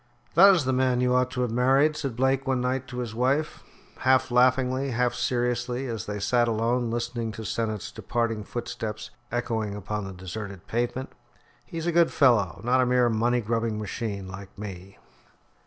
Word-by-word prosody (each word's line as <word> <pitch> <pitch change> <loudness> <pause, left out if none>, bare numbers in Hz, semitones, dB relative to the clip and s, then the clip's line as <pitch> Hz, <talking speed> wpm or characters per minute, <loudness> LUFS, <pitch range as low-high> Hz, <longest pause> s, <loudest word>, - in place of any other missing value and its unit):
"That 195 +3 +8
is 155 -7 0
the 130 - +1
man 130 -1 +2
you 125 0 +2
ought 125 0 +2
to 125 0 -3
have 125 -2 0
married," 135 +5 +3
said 140 -6 -3
Blake 135 +2 +1
one 130 -1 +1
night 130 +1 -1
to 125 - -8
his 120 -3 -4
wife, 135 +6 0 0.4
half 130 -1 +2
laughingly, 130 +2 +3
half 125 0 +1
seriously, 125 +1 -1
as 115 -5 -4
they 105 0 -3
sat 120 +3 +2
alone, 115 +2 0
listening 120 -1 -2
to 110 +1 -7
Sennett's 110 -2 -3
departing 115 -2 -2
footsteps 110 -1 -5 0.2
echoing 110 -4 -2
upon 105 0 -4
the 95 - -6
deserted 95 +1 -7
pavement. 120 +3 -2 0.5
"He's 165 -1 -5
a 175 - +1
good 170 0 +4
fellow 120 - +3
not 125 +2 +3
a - - +3
mere 125 -1 +3
money 120 +2 +1
grubbing 115 0 -1
machine 105 -2 -4
like 95 +1 -10
me." 100 -2 -8
120 Hz, 175 wpm, -26 LUFS, 110-130 Hz, 0.5 s, That